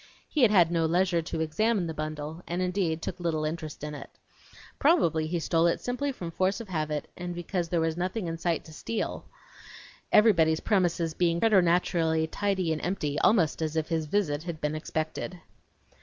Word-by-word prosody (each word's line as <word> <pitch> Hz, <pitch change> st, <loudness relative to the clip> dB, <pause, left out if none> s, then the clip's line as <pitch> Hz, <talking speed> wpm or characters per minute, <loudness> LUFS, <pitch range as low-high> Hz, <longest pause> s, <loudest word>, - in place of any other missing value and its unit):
He 300 Hz, -, -1 dB
had 240 Hz, -, +7 dB
had 175 Hz, -5 st, +5 dB
no 165 Hz, -1 st, +2 dB
leisure 175 Hz, 0 st, +2 dB
to 160 Hz, 0 st, -4 dB
examine 195 Hz, +5 st, +1 dB
the 160 Hz, -, -4 dB
bundle, 155 Hz, +1 st, -5 dB
and 175 Hz, +1 st, -2 dB
indeed 180 Hz, -3 st, -1 dB
took 180 Hz, -, -4 dB
little 160 Hz, -3 st, -1 dB
interest 155 Hz, -2 st, -5 dB
in 150 Hz, 0 st, -4 dB
it. 145 Hz, -, -8 dB, 0.7 s
Probably 170 Hz, -, +3 dB
he 170 Hz, +1 st, -1 dB
stole 165 Hz, +1 st, +2 dB
it 170 Hz, -, +1 dB
simply 265 Hz, +3 st, -2 dB
from 175 Hz, -10 st, -6 dB
force 185 Hz, +3 st, 0 dB
of 230 Hz, -4 st, -8 dB
habit, 155 Hz, -3 st, -2 dB
and 175 Hz, -1 st, -5 dB
because 175 Hz, 0 st, -3 dB
there 170 Hz, -, +1 dB
was 160 Hz, 0 st, 0 dB
nothing 185 Hz, +5 st, -2 dB
else -, -, -2 dB
in 165 Hz, -, -4 dB
sight 170 Hz, -1 st, -1 dB
to 160 Hz, -, -12 dB
steal, 225 Hz, +7 st, -4 dB, 0.9 s
everybody's 165 Hz, -8 st, +5 dB
premises 175 Hz, -5 st, +1 dB
being 170 Hz, 0 st, +1 dB
preternaturally 170 Hz, -5 st, +3 dB
tidy 185 Hz, -1 st, -1 dB
and 155 Hz, -, -4 dB
empty, 155 Hz, -5 st, -1 dB
almost 175 Hz, -8 st, +3 dB
as 155 Hz, 0 st, -2 dB
if 160 Hz, -1 st, -1 dB
his 160 Hz, -2 st, -1 dB
visit 155 Hz, -5 st, 0 dB
had 170 Hz, -1 st, -6 dB
been 150 Hz, 0 st, -1 dB
expected! 155 Hz, +3 st, -4 dB
170 Hz, 185 wpm, -28 LUFS, 160-185 Hz, 0.9 s, had